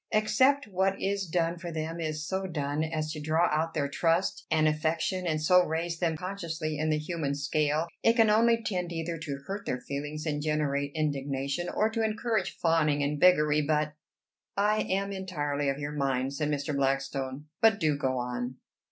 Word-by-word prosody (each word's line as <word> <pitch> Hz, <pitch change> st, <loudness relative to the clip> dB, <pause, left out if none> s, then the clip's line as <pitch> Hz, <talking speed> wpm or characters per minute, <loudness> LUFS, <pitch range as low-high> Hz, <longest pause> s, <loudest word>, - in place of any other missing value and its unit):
Except 260 Hz, +6 st, +3 dB
what 195 Hz, 0 st, 0 dB
is 195 Hz, -1 st, -1 dB
done 170 Hz, 0 st, 0 dB
for 170 Hz, 0 st, -6 dB
them 160 Hz, +1 st, -4 dB
is 155 Hz, -1 st, -3 dB
so 190 Hz, +3 st, -2 dB
done 150 Hz, -2 st, -2 dB
as 155 Hz, -1 st, -2 dB
to 155 Hz, -1 st, -5 dB
draw 160 Hz, +3 st, +2 dB
out 160 Hz, +2 st, 0 dB
their 145 Hz, -2 st, +1 dB
trust 165 Hz, +5 st, 0 dB
and 155 Hz, 0 st, +3 dB
affection, 160 Hz, +4 st, 0 dB
and 155 Hz, -2 st, +1 dB
so 180 Hz, +4 st, +5 dB
raise 165 Hz, +1 st, -2 dB
them 165 Hz, -3 st, 0 dB
consciously 165 Hz, -4 st, -4 dB
in 155 Hz, 0 st, 0 dB
the 155 Hz, -, +2 dB
human 150 Hz, -2 st, -2 dB
scale, 150 Hz, +2 st, +1 dB, 0.2 s
it 230 Hz, -, +4 dB
can 225 Hz, -2 st, +5 dB
only 230 Hz, +2 st, +4 dB
tend 180 Hz, -5 st, -2 dB
either 165 Hz, 0 st, -3 dB
to 140 Hz, -3 st, -5 dB
hurt 200 Hz, +1 st, -5 dB
their 125 Hz, -, -1 dB
feelings 145 Hz, +4 st, -5 dB
and 150 Hz, -2 st, -1 dB
generate 145 Hz, -2 st, 0 dB
indignation, 140 Hz, +1 st, -1 dB
or 215 Hz, -, +2 dB
to 225 Hz, 0 st, -1 dB
encourage 220 Hz, +1 st, -1 dB
fawning 155 Hz, -3 st, +2 dB
and 145 Hz, +1 st, -1 dB
beggary. 150 Hz, -4 st, +5 dB
But" 150 Hz, 0 st, 0 dB, 0.6 s
"I 210 Hz, +2 st, +3 dB
am 195 Hz, +1 st, 0 dB
entirely 145 Hz, -7 st, -2 dB
of 135 Hz, -, -1 dB
your 145 Hz, 0 st, -4 dB
mind," 135 Hz, -2 st, -1 dB
said 150 Hz, +1 st, -1 dB
Mr. 145 Hz, 0 st, -1 dB
Blackstone. 135 Hz, 0 st, -1 dB, 0.2 s
"But 220 Hz, -2 st, +5 dB
do 155 Hz, -4 st, +2 dB
go 130 Hz, -3 st, -1 dB
on." 125 Hz, +1 st, -3 dB
155 Hz, 185 wpm, -29 LUFS, 145-180 Hz, 0.6 s, so